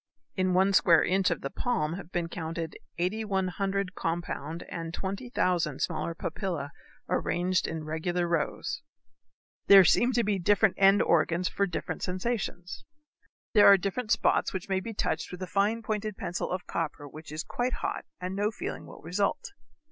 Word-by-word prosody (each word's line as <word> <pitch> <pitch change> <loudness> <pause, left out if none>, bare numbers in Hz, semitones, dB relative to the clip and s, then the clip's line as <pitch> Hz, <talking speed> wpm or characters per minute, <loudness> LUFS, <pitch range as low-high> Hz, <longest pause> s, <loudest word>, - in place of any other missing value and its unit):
In 185 -1 +1
one 190 +2 +4
square 170 -3 +6
inch 190 0 +2
of 170 - -2
the 140 - -4
palm 200 -11 -1
have 180 -1 -8
been 175 -1 -1
counted 165 -1 -5 0.2
8,100 195 0 -1
compound 165 -2 -3
and 165 0 -6
20,000 185 - -1
smaller 165 0 -2
papillæ 165 -4 -3 0.4
arranged 180 +1 0
in 160 -1 -4
regular 170 +3 -1
rows. 170 -3 -1 0.9
There 195 -2 +9
seem 240 +8 +4
to 240 0 +2
be 205 -2 0
different 205 +2 +3
end 195 +1 +6
organs 170 +2 +2
for 200 - 0
different 175 - -4
sensations. 185 -2 -3 0.7
There 210 -3 +7
are 200 - +9
different 200 +5 -3
spots 225 0 +2
which 190 -2 -4
may 190 -1 +1
be 225 +3 -7
touched - - -2
with 180 +1 -6
a - - -1
fine 200 +5 +1
pointed 215 -1 -3
pencil 175 - -3
of 185 0 -3
copper 150 -3 -3
which 155 +2 -11
is 155 +2 -4
quite 245 +1 -2
hot - - -3 0.2
and 185 +1 -4
no 205 +1 +1
feeling 220 - -6
will - - -12
result. 185 +5 -1
185 Hz, 165 wpm, -29 LUFS, 170-200 Hz, 0.9 s, There